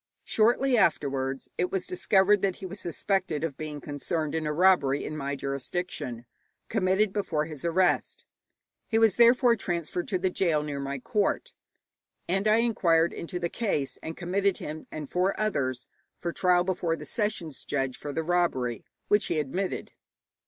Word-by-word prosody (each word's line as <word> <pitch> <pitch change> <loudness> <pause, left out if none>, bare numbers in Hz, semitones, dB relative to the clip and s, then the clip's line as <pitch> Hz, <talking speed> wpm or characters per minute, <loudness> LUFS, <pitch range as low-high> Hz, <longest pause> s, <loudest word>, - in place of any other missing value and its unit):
Shortly 245 +4 +3
afterwards 135 -7 0
it 180 - +1
was 190 -2 -1
discovered 190 +2 +3
that 190 -2 +1
he 195 - -9
was 190 +2 -7
suspected 175 -2 -1
of 160 -4 -2
being 150 0 -5
concerned 150 +2 -3
in 160 -1 -1
a - - 0
robbery 150 -5 +3
in 155 - -5
my 140 -1 -3
jurisdiction, 135 -3 -4 0.4
committed 195 -1 +2
before 165 -7 -1
his 155 -4 -8
arrest. 175 +2 +1 0.6
He 225 - +1
was 225 -3 +5
therefore 240 0 +5
transferred 175 -3 -3
to 190 - 0
the 185 0 0
gaol 165 -5 +1
near 145 -2 -4
my 140 0 -3
court, 200 +9 -1 0.7
and 195 +4 +1
I 215 - +5
inquired 175 -8 +3
into 170 +1 -5
the 175 -1 -1
case, 150 - -2
and 160 - -6
committed 190 +2 0
him 155 +1 -7
and 150 -2 -5
four 185 +5 0
others 130 - -1 0.3
for 170 - -3
trial 180 -1 +3
before 180 -3 0
the - - -9
sessions 200 - -2
judge 135 -2 -1
for 145 - -6
the 160 +3 -2
robbery, 160 -9 0 0.2
which 205 0 +3
he 170 - 0
admitted. 180 +7 -3
175 Hz, 165 wpm, -28 LUFS, 150-195 Hz, 0.7 s, was